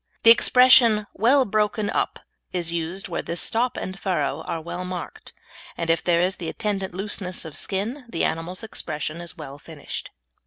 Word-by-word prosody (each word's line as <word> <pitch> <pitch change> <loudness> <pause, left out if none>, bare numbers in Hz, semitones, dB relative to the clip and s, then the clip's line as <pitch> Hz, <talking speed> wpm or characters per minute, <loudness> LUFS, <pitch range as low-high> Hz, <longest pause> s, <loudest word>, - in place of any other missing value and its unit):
The 230 - +9
expression 245 -3 +6
"well 260 +6 +4
broken 210 0 0
up" - - -1 0.3
is 175 -2 -2
used 170 +5 -2
where - - -3
this 170 - -4
stop 240 +2 0
and 190 +1 -5
furrow 155 -6 -1
are 165 - -2
well 170 +3 -5
marked, 180 -1 -7 0.5
and 165 -1 +1
if 165 - +1
there 170 -1 +3
is 185 +2 +1
the 165 - -4
attendant 195 -3 -3
looseness 190 -2 -1
of 155 -2 -8
skin 220 - -2
the 170 - -2
animal's 175 +6 -2
expression 155 -6 -4
is 175 +1 -8
well 145 -2 -8
finished. 150 -1 -6
185 Hz, 170 wpm, -24 LUFS, 165-215 Hz, 0.5 s, The